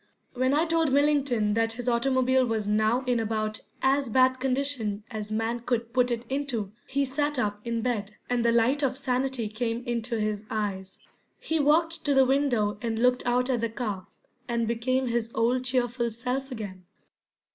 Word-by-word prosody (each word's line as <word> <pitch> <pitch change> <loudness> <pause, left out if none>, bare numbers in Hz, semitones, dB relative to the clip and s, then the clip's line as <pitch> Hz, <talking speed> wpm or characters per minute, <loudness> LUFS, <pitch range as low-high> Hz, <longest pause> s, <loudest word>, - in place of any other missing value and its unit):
When 260 +2 +1
I 315 +3 +3
told 325 -3 +1
Millington 275 -7 +2
that 225 +1 +1
his 245 +1 -6
automobile 260 +1 +3
was 225 -4 -1
now 215 +4 +2
in 250 -2 +1
about 215 -1 -2 0.2
as 270 -1 +2
bad 255 +2 +4
condition 255 -6 -1
as 215 -1 -5
man 225 +2 -1
could 235 -1 -2
put 250 -1 +3
it 240 0 -2
into, 260 -7 -2 0.2
he 280 +1 0
sat 290 +2 -1
up 210 -3 -1
in 230 -1 -2
bed, 210 -4 -2
and 245 -1 0
the 235 - +4
light 235 +5 +3
of 265 -2 0
sanity 260 -3 -1
came 230 +2 -3
into 235 -1 -2
his 210 -1 -1
eyes. 195 -3 -3 0.4
He 320 0 -1
walked 320 +3 +2
to 285 -2 +2
the 265 0 +6
window 245 -7 +1
and 230 -1 -2
looked 250 +2 +2
out 250 +1 +2
at 240 -3 0
the 230 - 0
car, 215 -5 -4 0.4
and 235 -1 0
became 255 +3 0
his 235 -2 -1
old 245 +3 +1
cheerful 245 -2 0
self 250 +4 -3
again. 195 -6 -7
245 Hz, 180 wpm, -27 LUFS, 225-265 Hz, 0.4 s, the